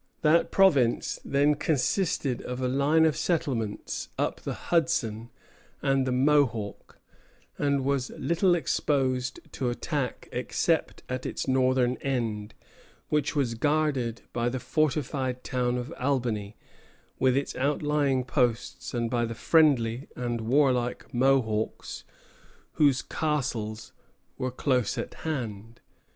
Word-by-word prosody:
That 160 +2 +4
province 140 -12 +3
then 145 +2 +3
consisted 145 -2 0
of 125 0 -5
a 130 - 0
line 140 +5 +3
of 155 -2 +2
settlements 135 - -2
up - - -1
the - - -4
Hudson 120 -10 0 0.5
and 135 -1 +1
the - - +1
Mohawk, 125 -6 +1 0.6
and 140 -2 +1
was 135 -2 0
little 175 +2 +2
exposed 130 -6 0
to 130 -2 -2
attack 135 +1 -3
except - - -1
at 130 0 -3
its - - -4
northern 130 -1 +2
end, 115 -6 -2 0.5
which 150 0 0
was 135 -5 +1
guarded 140 -3 0
by 120 0 0
the 130 +1 -3
fortified 135 -3 -1
town 125 -1 0
of 125 +6 -5
Albany, 120 -6 -1 0.6
with 130 0 +3
its 140 - -2
outlying 145 -1 +1
posts, 125 -2 -1
and 120 -1 0
by 120 0 0
the 115 0 -3
friendly 135 -5 +3
and 120 -2 -2
warlike 125 0 +1
Mohawks, 120 -4 0 0.7
whose 145 -4 +3
"castles" 120 -8 -2 0.5
were 130 - -1
close 125 -2 0
at - - -4
hand. 115 -7 -5
130 Hz, 120 wpm, -27 LUFS, 120-145 Hz, 0.7 s, That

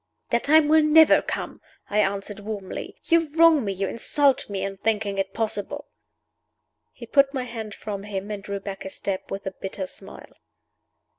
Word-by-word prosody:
"That 235 - +1
time 310 +1 +5
will 315 +1 +6
never 310 +1 +6
come!" - - -5 0.3
I 210 - 0
answered, 200 0 -1
warmly. 205 -2 -6
"You 330 -2 +2
wrong 325 -4 +6
me, 200 - -1
you 195 0 -2
insult 275 +5 +1
me, 195 -2 -3
in 195 0 -4
thinking 205 -1 -1
it 195 0 -1
possible!" 225 +7 -3 1.0
He - - -11
put 275 -1 +4
down - - -21
my 260 - -1
hand 225 -4 -7
from 205 -2 -5
him, 200 0 -5
and 205 -1 -4
drew 200 0 -5
back 195 0 -7
a 190 - -6
step, 190 0 -4
with 195 0 -5
a 190 - -2
bitter 190 0 -5
smile. - - -10
210 Hz, 180 wpm, -24 LUFS, 195-275 Hz, 1.0 s, will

